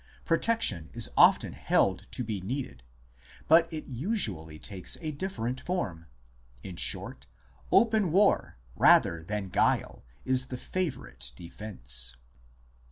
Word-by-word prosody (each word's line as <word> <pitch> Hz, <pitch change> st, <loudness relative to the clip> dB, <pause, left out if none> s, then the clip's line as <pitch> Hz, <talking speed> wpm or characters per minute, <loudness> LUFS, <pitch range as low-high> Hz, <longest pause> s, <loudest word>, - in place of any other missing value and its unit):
Protection 165 Hz, -, +1 dB
is -, -, +2 dB
often -, -, +5 dB
held -, -, +1 dB
to 125 Hz, -, -2 dB
be 105 Hz, -4 st, -4 dB
needed; 125 Hz, -, -5 dB, 0.7 s
but 165 Hz, +1 st, +5 dB
it 155 Hz, -1 st, -6 dB
usually 115 Hz, -, -2 dB
takes 90 Hz, +1 st, 0 dB
a 155 Hz, -2 st, -4 dB
different 140 Hz, -6 st, -4 dB
form.... 95 Hz, -, -4 dB, 0.6 s
In 95 Hz, -, -8 dB
short, -, -, 0 dB, 0.4 s
open 220 Hz, -6 st, +3 dB
war 195 Hz, -, +2 dB, 0.2 s
rather 85 Hz, -1 st, +4 dB
than 100 Hz, +3 st, -4 dB
guile -, -, 0 dB, 0.2 s
is 130 Hz, 0 st, +3 dB
the 125 Hz, -, -6 dB
favourite 130 Hz, -, -4 dB
defence. 65 Hz, -, -4 dB
120 Hz, 115 wpm, -28 LUFS, -, 0.7 s, often